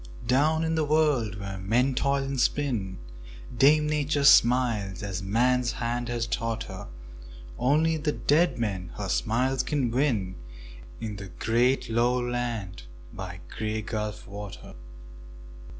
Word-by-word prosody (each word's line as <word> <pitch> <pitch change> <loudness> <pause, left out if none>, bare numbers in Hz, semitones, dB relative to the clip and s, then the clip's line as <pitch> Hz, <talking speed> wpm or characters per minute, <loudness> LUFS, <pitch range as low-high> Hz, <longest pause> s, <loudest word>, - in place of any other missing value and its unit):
Down 150 +6 +2
in 160 0 0
the 160 -1 +1
world 145 -8 +2
where 100 -1 -6
men 120 +8 +1
toil 140 +2 +1
and 135 -1 -3
spin 120 -9 0 0.6
Dame 150 +5 +5
Nature 150 -1 0
smiles 115 -8 +4
as 95 -2 -4
man's 120 +5 +1
hand 120 0 -2
has 120 -1 -1
taught 115 -1 -2
her; 95 0 -8 0.7
Only 155 +5 +2
the 150 0 -1
dead 150 -1 +2
men 95 -6 -3
her - - -4
smiles 125 - +1
can 130 -3 -1
win 115 -8 0 0.6
In 105 -2 -5
the 100 0 -7
great 120 +8 +1
lone 120 +2 +1
land 115 - -3 0.3
by - - -7
the - - -13
Grey 110 0 -2
Gulf 105 -3 -4
water. 100 0 -9
120 Hz, 135 wpm, -27 LUFS, 105-140 Hz, 0.7 s, Dame